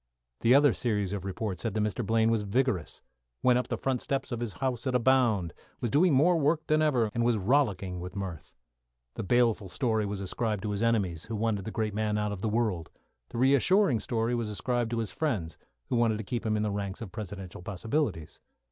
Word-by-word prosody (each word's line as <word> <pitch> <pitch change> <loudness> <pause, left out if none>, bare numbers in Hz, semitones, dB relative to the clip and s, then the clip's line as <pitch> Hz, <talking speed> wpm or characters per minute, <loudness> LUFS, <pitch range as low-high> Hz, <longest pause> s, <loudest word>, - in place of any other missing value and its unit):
The 120 +3 +5
other 145 0 +6
series 105 -5 -1
of 100 -2 -4
reports 95 -1 -3
said 115 - -3
that - - +1
Mr. 105 +3 -1
Blaine 110 +2 +2
was 115 -2 +1
vigorous; 105 - -1 0.4
went 125 -1 +5
up 125 - -3
the - - -2
front 130 -2 -1
steps 135 -1 -2
of 120 - -2
his 120 -4 -3
house 130 0 -2
at 130 - 0
a - - +4
bound; 115 -9 +2 0.3
was 120 - -2
doing 170 +7 +4
more 165 +5 +4
work 155 +2 +1
than 155 0 +2
ever, 125 -8 +2
and 120 - 0
was 120 -1 +2
rollicking 100 -5 +1
with 90 +2 -7
mirth. 95 -5 -6 0.6
The - - -5
baleful 115 -2 +2
story 110 -2 0
was 100 -1 -4
ascribed 105 +1 -2
to 105 - -2
his 100 0 -2
enemies, 100 -9 +1
who 115 - -4
wanted 105 -3 -1
the - - -3
great 110 -2 -2
man 105 0 0
out 105 0 -1
of 100 -2 -5
the 110 - 0
world. 105 -7 -1 0.4
The - - -7
reassuring 140 - +4
story 115 +1 -1
was 120 -3 -1
ascribed 120 +2 -1
to 120 - -2
his 115 -3 -2
friends, 105 - -2 0.3
who - - 0
wanted 115 -2 +2
to 110 - -5
keep 120 +2 -3
him 110 0 +1
in 105 - 0
the 105 - 0
ranks 100 0 -4
of 105 -5 -6
Presidential 100 -4 -7
possibilities. 105 - -2
110 Hz, 220 wpm, -29 LUFS, 100-125 Hz, 0.6 s, other